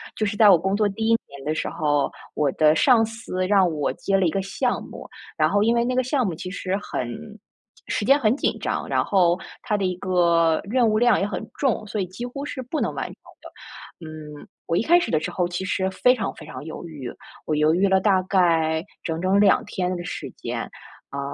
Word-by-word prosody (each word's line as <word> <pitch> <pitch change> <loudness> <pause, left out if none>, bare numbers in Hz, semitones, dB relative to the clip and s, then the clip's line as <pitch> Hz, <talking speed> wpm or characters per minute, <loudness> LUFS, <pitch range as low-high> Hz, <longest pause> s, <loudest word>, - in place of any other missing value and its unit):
就 215 - -1
是 205 0 -2
在 215 -2 +7
我 185 - +8
工 190 +4 -1
作 210 0 +2
第 220 +3 -3
1 - - +2 0.2
年 140 -1 -12
的 155 - 0
时 - - -2
候， 145 -2 0 0.2
我 145 -3 +1
的 155 0 +4
上 230 - +5
司 225 -5 -4
让 195 -2 +4
我 150 -3 -1
接 195 0 0
了 190 - +2
一 165 - +3
个 195 - -1
项 245 +6 -1
目， - - -10 0.3
然 - - +3
后 205 - +2
因 230 +2 +3
为 235 - +2
那 250 +1 -1
个 255 - +2
项 255 0 0
目 185 - -1
其 170 +3 -6
实 185 0 -3
很 125 -11 -4 0.8
时 205 - -1
间 275 +5 +6
很 225 -2 +2
紧 - - -1
张， - - -2
然 - - +1
后 180 -3 +3 0.2
它 220 -4 -1
的 200 - -2
一 185 -1 -1
个 170 -3 +2
任 235 +3 +2
务 215 - +2
量 240 -1 +4
也 195 - 0
很 205 - -4 0.2
重， 260 -6 0
所 215 0 -4
以 185 - -1
几 195 +7 -7
乎 275 +4 -6
是 265 - -5
不 255 +5 -4
能 - - -1
完 - - -3
成 - - -8 0.3
的。 165 - -13
嗯， 150 -1 -10 0.2
我 165 - +1
一 - - +2
开 345 +9 +5
始 - - -3
的 155 - +2
时 155 - -4
候 180 - 0
其 175 +2 -4
实 190 0 0
非 250 +6 +3
常 220 - -3
非 - - -11
常 - - -8
犹 160 - -7
豫， 140 -6 -7 0.3
我 155 - -1
犹 150 +1 +3
豫 195 +3 +3
了 190 0 +4
大 190 -1 +3
概 165 -4 +2 0.2
整 160 -1 -3
整 190 +2 +2
2 205 0 +4
天 185 -3 -2
的 175 - -6
时 - - -6
间， - - -4 0.5
呃， 140 - -4
190 Hz, 255 characters per minute, -23 LUFS, 165-220 Hz, 0.8 s, 我